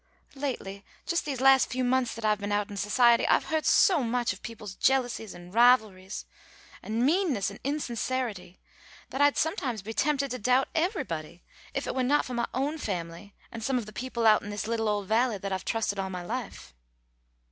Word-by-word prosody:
Lately, 245 -8 -5 0.2
just 340 +1 -1
these 275 -4 -3
last 270 -1 +6
few 255 0 -1
months 255 0 +1
that 230 -1 -5
I've 210 -1 +2
been 205 0 -4
out 205 0 0
in - - -6
society 235 +4 +4
I've - - +4
heard 315 -1 +1
so 360 -7 +5
much 240 -2 0
of 185 - -14
people's 220 -3 -8
jealousies 245 -2 0
and 175 +1 -12
rivalries 220 -5 +3 0.6
and 225 +2 -1
meannesses 295 - +1
and 200 - -11
insincerity, 245 - -3 0.5
that 265 - -2
I'd 290 0 +4
sometimes 255 - -1
be 220 +2 -6
tempted 280 0 0
to 250 - -3
doubt 255 +5 +2
everybody, 270 - -2 0.3
if - - -1
it - - -3
were 260 - 0
not 280 +4 +2
for 255 - -6
my 235 -1 -1
own 285 +5 -2
family 180 - -5 0.2
and 230 -1 -7
some 265 +2 +1
of 235 - -3
the 215 - -11
people 245 0 -3
out 215 -1 +6
in 205 - -8
this 205 0 -4
little 225 -1 -1
old 205 -2 -1
Valley 225 +1 +2
that 195 0 -5
I've 190 -1 -3
trusted 220 -3 -1
all 190 0 -2
my 180 -1 -5
life. 235 +4 -6
230 Hz, 200 wpm, -28 LUFS, 205-260 Hz, 0.6 s, last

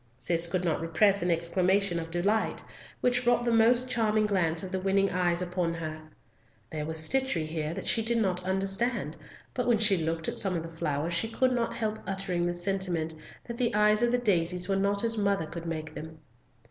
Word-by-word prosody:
Cis 165 +5 +2
could 180 +1 -2
not 160 -2 0
repress 195 +5 +2
an 175 - 0
exclamation 180 +2 +1
of 165 0 -6
delight, 200 +6 0 0.4
which 250 0 +2
brought 240 0 +2
the 235 - +1
most 235 +2 +4
charming 220 -3 +1
glance 170 -5 0
of 185 - -6
the 190 - -1
winning 195 +1 +1
eyes 175 0 +1
upon 175 -2 -2
her. 155 -1 -5 0.7
There 150 -1 -4
was 160 0 -3
stitchery 185 0 +1
here 155 0 -3
that - - -6
she 225 - +3
did 235 +1 +1
not 185 -5 0
understand, 195 +6 -1 0.4
but 250 -1 -2
when 240 -2 +4
she 210 -3 +3
looked 165 0 -2
at - - -3
some 190 -2 +2
of 165 - -2
the 165 0 -10
flowers, 160 0 -2
she 225 +7 0
could 255 +2 +1
not 240 -2 -1
help 220 -1 -2
uttering 190 -3 -1
the 175 - -2
sentiment 175 -3 -1 0.3
that 235 -1 -6
the 240 -4 +1
eyes 210 +1 +4
of 240 0 +2
the 245 - +3
daisies 180 -6 +1
were 195 - +1
not 200 +1 +1
as 230 -1 0
mother 200 -4 +1
could 170 +1 -7
make 160 -1 -5
them. 160 0 -8
190 Hz, 210 wpm, -28 LUFS, 165-220 Hz, 0.7 s, most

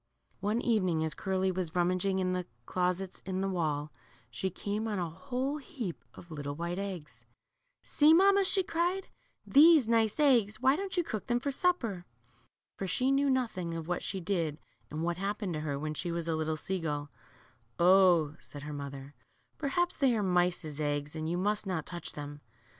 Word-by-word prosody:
One 210 +3 0
evening 185 -9 +1
as 160 -1 -1
Curly 190 0 0
was 180 -3 -3
rummaging 185 +2 +1
in 185 -1 0
the 180 -1 -2 0.2
closets 180 +1 -1
in 190 0 -2
the 195 - 0
wall, 155 -5 -1 0.4
she 190 +11 -2
came 205 +4 -3
on 210 -2 -2
a 175 -2 -1
whole 255 - -3
heap 265 - -6
of 170 - -13
little 145 -2 -4
white 170 +3 -3
eggs.. 185 -6 -7 0.6
See, 300 +1 +4
mamma," 395 +4 +6
she 380 0 +2
cried, 355 +3 -1 0.4
^Hhese 300 -2 +7
nice 225 0 +2
eggs; 240 -8 +4
why 265 +2 +4
don't 380 +2 -4
you 350 - +3
cook 220 -10 -5
them 240 0 +2
for 280 +3 -2
supper." 240 - 0 0.7
For 195 - -3
she 255 +9 +2
knew 275 +1 +3
nothing 220 -10 -1
of 165 -1 -5
what 175 0 -1
she 190 - -3
did 170 -5 -1 0.3
and 155 +2 -4
what 170 0 -1
happened 200 -1 -2
to 155 - -2
her 145 -2 -2
when 155 +2 -3
she 170 +3 -3
was 170 -1 -3
a 165 - +1
little 155 0 -1
sea 190 +4 -3
gull, 145 -3 -3 0.7
0," 175 -4 +5
said 145 -1 -10
her 150 0 -6
mother, 140 -1 -7 0.5
perhaps 345 +5 0
they 265 -4 +3
are 210 - 0
mice's 175 -5 +1
eggs, 145 0 -2
and 155 0 -3
you 175 - -1
must 205 +2 0
not' 175 -5 -2
touch 175 -1 -7
them." 145 0 -7
185 Hz, 185 wpm, -31 LUFS, 160-235 Hz, 0.7 s, ^Hhese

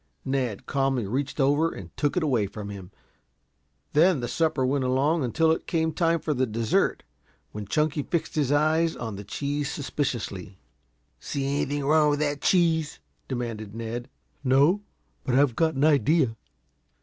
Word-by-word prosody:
Ned 130 -6 -2
calmly 135 -4 0
reached 135 +8 -3
over 145 +4 +3
and - - -10
took 145 +1 0
it 180 - +2
away 120 -9 +1
from 100 +1 -7
him; 95 -3 -8 1.0
then 165 +1 +4
the 120 - -3
supper 150 -1 +1
went 135 +1 +1
along 135 +5 +1
until 160 +6 +2
it 160 - -2
came 160 -1 0
time 165 +1 +2
for 155 - -1
the 130 -1 0
dessert, 110 0 0 0.5
when 105 -1 -7
Chunky 150 +3 +1
fixed 160 +2 -2
his 145 -3 0
eyes 160 +3 +2
on 110 -3 -5
the 100 - -7
cheese 145 +7 -3
suspiciously. 110 - -4 0.6
"See 140 -1 -3
anything 140 0 -1
wrong 150 +1 +4
with 145 0 0
that 145 -1 -1
cheese?" 165 -4 +2 0.3
demanded 115 -5 -4
Ned. 115 +2 -5 0.3
"No, 140 +9 +4 0.4
but 125 - 0
I've 135 -3 +3
got 160 -2 +1
an 135 - 0
idea." 145 -4 +3
140 Hz, 160 wpm, -26 LUFS, 120-155 Hz, 1.0 s, then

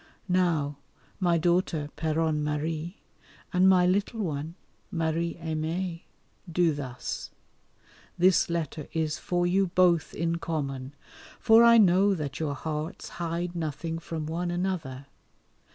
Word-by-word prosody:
Now, 165 -6 +1 0.4
my 175 -3 +3
daughter 170 -3 +1
(Péronne 160 -1 0
Marie), 155 +4 -3 0.6
and 185 +1 +5
my 180 -1 +5
little 200 +5 0
one 155 -1 -4 0.3
(Marie 165 0 -1
Aimée), 165 +2 -3 0.5
do 170 -1 +3
thus; 130 -4 -5 0.9
this 180 0 +4
letter 160 -3 -3
is 160 -2 -1
for 175 0 0
you 190 +2 +2
both 175 -2 +2
in 170 +1 0
common, 140 -5 -4 0.4
for 225 0 +6
I 235 0 +8
know 195 -1 +5
that 145 -5 -5
your 150 -3 -1
hearts 155 +2 -5
hide 170 +1 -2
nothing 165 0 -3
from 160 -2 -5
one 170 +3 -2
another. 175 -7 -3
165 Hz, 120 wpm, -28 LUFS, 155-180 Hz, 0.9 s, I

